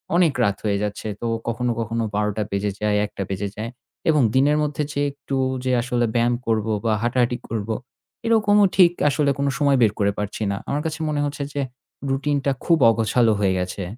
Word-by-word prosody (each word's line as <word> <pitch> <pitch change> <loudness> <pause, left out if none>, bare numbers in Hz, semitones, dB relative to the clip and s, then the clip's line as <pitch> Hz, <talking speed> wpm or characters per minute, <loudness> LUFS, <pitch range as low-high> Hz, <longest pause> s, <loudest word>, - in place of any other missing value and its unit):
অনেক 175 -5 +4
রাত 100 -3 +1
হয়ে 100 -1 +1
যাচ্ছে। 105 +1 -4
তো - - -3 0.2
কখনো, 120 +1 0
কখনো 115 0 -1
১২ঃ০০ 105 0 0
বেজে 100 +1 -1
যায়, 105 -1 +2
১ঃ০০ 105 - -8
বেজে 100 +1 -2
যায়। 110 +2 -4 0.4
এবং 150 -2 +4
দিনের 145 +3 +4
মধ্যে 150 0 -1
যে 145 - -1
একটু 140 -1 -6 0.3
যে 130 - +1
আসলে 120 0 0
ব্যায়াম 120 +1 +3
করব 110 -1 +1 0.2
বা 110 - +3
হাঁটাহাটি 120 0 +1
করব, 110 -1 -3 0.6
এরকমও 210 -3 +4
ঠিক 180 -3 +7 0.2
আসলে 145 0 +1
কোনো 140 0 +1
সময় 140 -2 +3
বের 110 - +5
করে 100 -1 +3
পারছি 105 +1 -3
না। 100 - -2
আমার 145 +1 0
কাছে 160 0 -3
মনে 150 - -1
হচ্ছে 145 0 -3
যে 145 - -1 0.5
routine 145 +2 0
টা 140 - +3
খুব 170 - +4
অগোছালো 115 +1 +3
হয়ে 95 -2 +3
গেছে। 90 +2 -3
120 Hz, 195 wpm, -22 LUFS, 105-145 Hz, 0.6 s, ঠিক